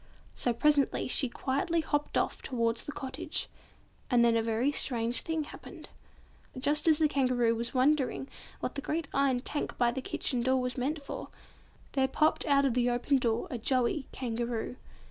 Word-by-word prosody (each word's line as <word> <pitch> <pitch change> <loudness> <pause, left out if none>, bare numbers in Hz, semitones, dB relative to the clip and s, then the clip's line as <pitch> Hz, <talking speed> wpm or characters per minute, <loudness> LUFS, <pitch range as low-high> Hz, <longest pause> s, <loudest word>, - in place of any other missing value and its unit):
So 245 - 0
presently 285 +3 +2
she 260 0 +2
quietly 280 +7 0
hopped 295 -1 -1
off - - -1
towards 230 -2 0
the - - -4
cottage, 295 +4 -2 0.6
and 240 -2 +4
then 230 -1 +4
a 230 - +3
very 230 +5 +1
strange 240 -4 +1
thing 320 -1 -2
happened. - - -11 0.7
Just 295 +4 +1
as 315 -2 +6
the 310 - +4
Kangaroo 255 -5 +2
was 235 +3 -4
wondering 270 0 +2 0.3
what - - -2
the 280 - -4
great 310 +2 -2
iron 270 -3 +2
tank 290 +3 -3
by 240 -1 +3
the 265 - -4
kitchen 250 -1 -1
door 260 +2 +2
was 250 0 -2
meant 285 +4 -2
for, - - -6 0.6
there 265 -1 +2
popped 305 +5 +1
out 280 -1 +4
of 265 - +2
the 245 0 +2
open 245 +3 +1
door 230 -2 0
a 245 - -3
joey 255 +4 +1
Kangaroo. 235 -1 -3
260 Hz, 175 wpm, -30 LUFS, 240-290 Hz, 0.7 s, as